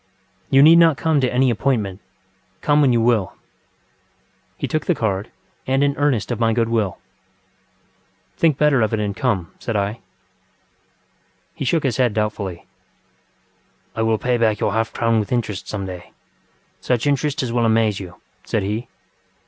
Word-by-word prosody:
You 135 Hz, +1 st, +6 dB
need 165 Hz, +2 st, +8 dB
not 165 Hz, -4 st, +5 dB
come 155 Hz, +1 st, +1 dB
to 125 Hz, -, +1 dB
any 130 Hz, 0 st, +2 dB
appointment. 110 Hz, -5 st, -1 dB, 0.6 s
Come 150 Hz, 0 st, +3 dB
when 135 Hz, -3 st, +4 dB
you 120 Hz, -, +2 dB
will. 115 Hz, -4 st, +2 dB
ŌĆØ -, -, -19 dB, 1.2 s
He -, -, -3 dB
took 155 Hz, -1 st, -2 dB
the 175 Hz, -, +2 dB
card, 105 Hz, -4 st, -2 dB, 0.4 s
and 135 Hz, +1 st, +2 dB
an 140 Hz, 0 st, +1 dB
earnest 140 Hz, -7 st, 0 dB
of 120 Hz, -, -3 dB
my 115 Hz, -1 st, +2 dB
good 115 Hz, 0 st, 0 dB
will. 110 Hz, -5 st, 0 dB, 1.4 s
ŌĆ£Think 160 Hz, -4 st, +3 dB
better 145 Hz, -4 st, +3 dB
of 110 Hz, 0 st, +1 dB
it -, -, -3 dB
and 100 Hz, -2 st, -2 dB
come, 105 Hz, -11 st, -1 dB
ŌĆØ -, -, -32 dB
said 115 Hz, -, -3 dB
I. 105 Hz, +3 st, -1 dB, 1.5 s
He -, -, -5 dB
shook 160 Hz, +5 st, +1 dB
his 130 Hz, -5 st, 0 dB
head 125 Hz, -5 st, +1 dB
doubtfully. 105 Hz, -5 st, -3 dB, 1.3 s
ŌĆ£I 110 Hz, -, 0 dB
will 110 Hz, -1 st, +2 dB
pay 125 Hz, +4 st, 0 dB
back 110 Hz, -3 st, +1 dB
your 100 Hz, -, 0 dB
half 115 Hz, 0 st, 0 dB
crown 115 Hz, -1 st, +1 dB
with 105 Hz, -, -4 dB
interest 110 Hz, -5 st, -2 dB
some 100 Hz, -2 st, -4 dB
dayŌĆösuch 95 Hz, +5 st, -7 dB
interest 145 Hz, +1 st, 0 dB
as 120 Hz, -2 st, -3 dB
will 120 Hz, -1 st, +1 dB
amaze 110 Hz, -2 st, +2 dB
you, 95 Hz, -, -6 dB, 0.4 s
ŌĆØ -, -, -27 dB
said 110 Hz, -, -1 dB
he. 110 Hz, +5 st, -3 dB
115 Hz, 175 wpm, -20 LUFS, 105-135 Hz, 1.5 s, need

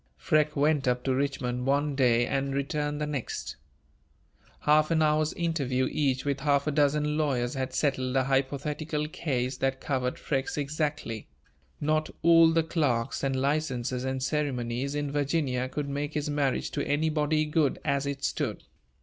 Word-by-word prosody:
Freke 150 Hz, -, +2 dB
went 145 Hz, -1 st, +2 dB
up 125 Hz, 0 st, +1 dB
to 135 Hz, -, +1 dB
Richmond 130 Hz, -2 st, -1 dB
one 145 Hz, +1 st, +2 dB
day 120 Hz, -3 st, +3 dB
and 135 Hz, 0 st, -1 dB
returned 145 Hz, +1 st, -1 dB
the 150 Hz, -, -1 dB
next. 145 Hz, -5 st, -4 dB, 1.1 s
Half 150 Hz, +1 st, +4 dB
an 160 Hz, -1 st, +3 dB
hour's 155 Hz, 0 st, +2 dB
interview 140 Hz, -7 st, 0 dB
each 135 Hz, -3 st, 0 dB
with 140 Hz, -1 st, 0 dB
half 140 Hz, 0 st, +2 dB
a 150 Hz, -, 0 dB
dozen 150 Hz, +1 st, +2 dB
lawyers 125 Hz, -5 st, 0 dB
had 130 Hz, -1 st, -3 dB
settled 130 Hz, -3 st, 0 dB
a 130 Hz, -, +3 dB
hypothetical 145 Hz, +3 st, -1 dB
case 130 Hz, -5 st, -2 dB
that 135 Hz, 0 st, 0 dB
covered 130 Hz, -3 st, -1 dB
Freke's 135 Hz, 0 st, -2 dB
exactly: 145 Hz, -6 st, -2 dB, 0.5 s
not 155 Hz, +1 st, +1 dB
all 165 Hz, 0 st, +7 dB
the 165 Hz, 0 st, +3 dB
clerks 140 Hz, -8 st, 0 dB
and 135 Hz, -1 st, +1 dB
licenses 130 Hz, -3 st, -1 dB
and 130 Hz, 0 st, -2 dB
ceremonies 135 Hz, -2 st, -1 dB
in 145 Hz, -1 st, -2 dB
Virginia 140 Hz, -3 st, 0 dB
could 145 Hz, +2 st, -3 dB
make 145 Hz, +2 st, -3 dB
his 150 Hz, 0 st, -1 dB
marriage 140 Hz, -3 st, 0 dB
to -, -, -2 dB
anybody 155 Hz, +1 st, +1 dB
good 150 Hz, -2 st, +1 dB
as 140 Hz, 0 st, 0 dB
it 140 Hz, -1 st, -4 dB
stood. -, -, -2 dB
140 Hz, 160 wpm, -28 LUFS, 130-150 Hz, 1.1 s, all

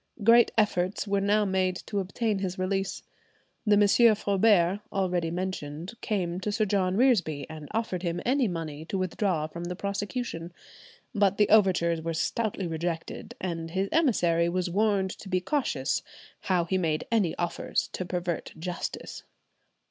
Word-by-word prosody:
Great 235 Hz, +2 st, +6 dB
efforts 200 Hz, -2 st, +1 dB
were 200 Hz, 0 st, +1 dB
now 205 Hz, +1 st, +3 dB
made 185 Hz, -1 st, +1 dB
to 200 Hz, +2 st, -4 dB
obtain 205 Hz, +2 st, -1 dB
his 190 Hz, -1 st, -3 dB
release. 195 Hz, +1 st, -2 dB, 0.6 s
The 210 Hz, -, +6 dB
M. 210 Hz, +2 st, +5 dB
Foubert, 200 Hz, -2 st, +3 dB
already 180 Hz, -4 st, 0 dB
mentioned, 175 Hz, -1 st, -4 dB
came 180 Hz, -5 st, -1 dB
to 205 Hz, +2 st, -2 dB
Sir 215 Hz, +1 st, +1 dB
John 190 Hz, -2 st, +1 dB
Reresby, 180 Hz, -, +2 dB
and 155 Hz, -2 st, -9 dB
offered 220 Hz, -6 st, -2 dB
him 175 Hz, -1 st, -2 dB
any 260 Hz, 0 st, +2 dB
money 160 Hz, -4 st, -5 dB
to 195 Hz, -, -3 dB
withdraw 185 Hz, -3 st, 0 dB
from 170 Hz, +2 st, -7 dB
the 180 Hz, +1 st, -4 dB
prosecution, 200 Hz, -3 st, -4 dB, 0.6 s
but 200 Hz, -3 st, +2 dB
the 210 Hz, -, +4 dB
overtures 180 Hz, -6 st, +4 dB
were 165 Hz, 0 st, -3 dB
stoutly 210 Hz, +2 st, -1 dB
rejected, 165 Hz, 0 st, -4 dB
and 165 Hz, -3 st, -3 dB
his 190 Hz, +3 st, -1 dB
emissary 175 Hz, -, +3 dB
was 180 Hz, 0 st, -1 dB
warned 200 Hz, -1 st, +2 dB
to 195 Hz, -, -10 dB
be 185 Hz, -1 st, +2 dB
cautious 180 Hz, -, -1 dB, 0.4 s
"how 180 Hz, -2 st, +1 dB
he 185 Hz, +2 st, 0 dB
made 155 Hz, -3 st, 0 dB
any 205 Hz, -8 st, +2 dB
offers 175 Hz, -1 st, -1 dB
to -, -, -4 dB
pervert 175 Hz, -1 st, -3 dB
justice." 175 Hz, +2 st, -5 dB
185 Hz, 155 wpm, -28 LUFS, 170-205 Hz, 0.6 s, Great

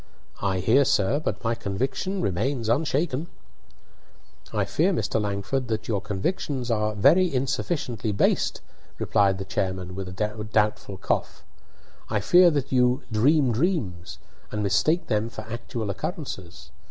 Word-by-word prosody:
"I 95 Hz, -2 st, 0 dB
hear, 120 Hz, +9 st, +5 dB
sir; 115 Hz, +2 st, +2 dB
but 155 Hz, -, -3 dB
my 115 Hz, 0 st, +1 dB
conviction 130 Hz, -, -2 dB
remains 115 Hz, +5 st, -1 dB
unshaken." 150 Hz, +3 st, 0 dB, 1.2 s
"I -, -, 0 dB
fear, -, -, +2 dB
Mr. 110 Hz, -, 0 dB
Langford, 105 Hz, +6 st, -2 dB
that 110 Hz, -1 st, -3 dB
your 105 Hz, -4 st, 0 dB
convictions 120 Hz, -, -2 dB
are 105 Hz, -1 st, 0 dB
very 175 Hz, -, +5 dB
insufficiently 130 Hz, -, -1 dB
based," 100 Hz, -, +1 dB, 0.4 s
replied 100 Hz, -3 st, +2 dB
the 95 Hz, -, -5 dB
chairman, 95 Hz, -2 st, -2 dB
with 95 Hz, 0 st, -5 dB
a 105 Hz, +3 st, -3 dB
doubtful 105 Hz, -2 st, 0 dB
cough." -, -, -2 dB, 0.7 s
I 110 Hz, -, +1 dB
fear 175 Hz, -, +6 dB
that 140 Hz, -4 st, -1 dB
you 125 Hz, 0 st, +3 dB
'dream 130 Hz, +4 st, +3 dB
dreams,' 105 Hz, -, -1 dB, 0.3 s
and 105 Hz, 0 st, -2 dB
mistake 155 Hz, -, +2 dB
them 110 Hz, 0 st, 0 dB
for 110 Hz, -, -7 dB
actual 115 Hz, -1 st, -4 dB
occurrences. 95 Hz, -, -6 dB
110 Hz, 135 wpm, -25 LUFS, 100-135 Hz, 1.2 s, fear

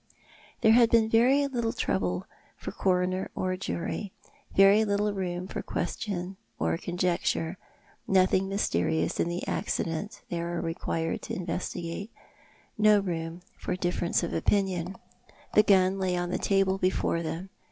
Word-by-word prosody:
There 220 Hz, -, +6 dB
had 235 Hz, 0 st, +6 dB
been 230 Hz, -1 st, +4 dB
very 255 Hz, +6 st, +4 dB
little 235 Hz, -4 st, -1 dB
trouble 90 Hz, -1 st, -1 dB, 0.3 s
for -, -, -6 dB
coroner 185 Hz, 0 st, 0 dB
or 185 Hz, 0 st, -1 dB
jury, 185 Hz, +2 st, -4 dB, 0.4 s
very 195 Hz, +2 st, +7 dB
little 205 Hz, 0 st, +1 dB
room 180 Hz, -2 st, -3 dB
for -, -, -4 dB
question 190 Hz, -2 st, -3 dB, 0.2 s
or -, -, 0 dB
conjecture, 175 Hz, -1 st, -1 dB, 0.5 s
nothing 190 Hz, 0 st, +3 dB
mysterious 85 Hz, -, 0 dB
in 170 Hz, -, +1 dB
the 175 Hz, +1 st, -4 dB
accident 165 Hz, +7 st, -2 dB
they 170 Hz, -, -1 dB
were 170 Hz, 0 st, -2 dB
required 165 Hz, 0 st, -2 dB
to -, -, -5 dB
investigate, 175 Hz, +2 st, -4 dB, 0.7 s
no 210 Hz, -1 st, +6 dB
room 170 Hz, -2 st, -4 dB, 0.2 s
for -, -, -2 dB
difference 175 Hz, -1 st, 0 dB
of 170 Hz, -, -3 dB
opinion. 190 Hz, -2 st, 0 dB, 0.6 s
The 210 Hz, -, +7 dB
gun 195 Hz, -2 st, +3 dB
lay 185 Hz, -1 st, 0 dB
on 175 Hz, 0 st, -2 dB
the -, -, -1 dB
table 195 Hz, -1 st, +2 dB
before 185 Hz, -2 st, +1 dB
them. 170 Hz, +4 st, -5 dB
185 Hz, 140 wpm, -28 LUFS, 170-200 Hz, 0.7 s, very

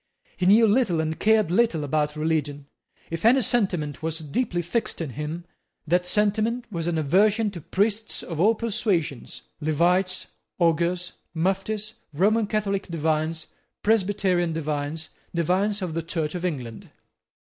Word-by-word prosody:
He 180 Hz, -, 0 dB
knew 220 Hz, +4 st, +7 dB
little 210 Hz, -6 st, +2 dB
and 160 Hz, 0 st, -2 dB
cared 215 Hz, -5 st, +3 dB
little 185 Hz, -6 st, +2 dB
about 150 Hz, +1 st, 0 dB
religion. 150 Hz, -2 st, -1 dB, 0.5 s
If 165 Hz, 0 st, -4 dB
any 250 Hz, +4 st, +6 dB
sentiment 185 Hz, -, 0 dB
was 160 Hz, 0 st, -2 dB
deeply 175 Hz, -, -2 dB
fixed 195 Hz, +8 st, -2 dB
in 160 Hz, -5 st, -3 dB
him, 150 Hz, +6 st, -5 dB, 0.4 s
that 180 Hz, +3 st, +1 dB
sentiment 215 Hz, +5 st, +1 dB
was 170 Hz, -3 st, -3 dB
an 170 Hz, -2 st, 0 dB
aversion 205 Hz, +8 st, +3 dB
to 175 Hz, -4 st, -8 dB
priests 205 Hz, +6 st, -1 dB
of 165 Hz, -2 st, -4 dB
all 220 Hz, +4 st, +5 dB
persuasions, 200 Hz, -, -2 dB, 0.2 s
Levites, 175 Hz, +5 st, +1 dB, 0.3 s
Augurs, 175 Hz, +1 st, +1 dB, 0.2 s
Muftis, 195 Hz, +5 st, -1 dB, 0.2 s
Roman 210 Hz, +6 st, +3 dB
Catholic 200 Hz, -2 st, -1 dB
divines, 160 Hz, -1 st, -1 dB, 0.4 s
Presbyterian 190 Hz, -5 st, +2 dB
divines, 155 Hz, 0 st, -3 dB, 0.3 s
divines 190 Hz, +5 st, +1 dB
of 175 Hz, -3 st, -3 dB
the 165 Hz, -, -1 dB
Church 160 Hz, -2 st, -3 dB
of 180 Hz, -1 st, -4 dB
England. 125 Hz, -10 st, -5 dB
175 Hz, 135 wpm, -25 LUFS, 160-210 Hz, 0.5 s, knew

